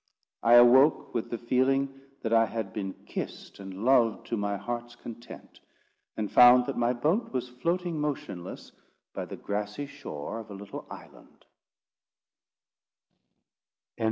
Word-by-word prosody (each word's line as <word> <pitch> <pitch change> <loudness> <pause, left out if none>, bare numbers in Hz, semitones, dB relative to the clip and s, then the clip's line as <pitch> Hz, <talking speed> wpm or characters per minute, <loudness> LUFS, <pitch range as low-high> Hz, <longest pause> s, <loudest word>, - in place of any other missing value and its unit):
I 115 - +4
awoke 130 +5 +6
with 115 - -2
the 120 - -3
feeling 135 +3 0 0.2
that 115 -1 -1
I 115 0 +5
had 110 -4 -5
been 95 -3 -4
kissed - - -7
and 95 +2 -7
loved 120 -4 +3
to - - 0
my 100 -1 -2
heart's 120 +2 -5
content; 120 0 -11 0.6
and 105 -2 -3
found 125 0 +8
that 140 - -3
my 120 0 +1
boat 155 - 0
was 125 -1 -3
floating 170 +5 -2
motionless 95 -12 -5 0.4
by - - -4
the - - -8
grassy 105 +6 -4
shore 115 - -7
of 110 -1 -10
a 100 - -8
little 100 0 -9
island. - - -14
120 Hz, 135 wpm, -28 LUFS, 105-135 Hz, 0.6 s, found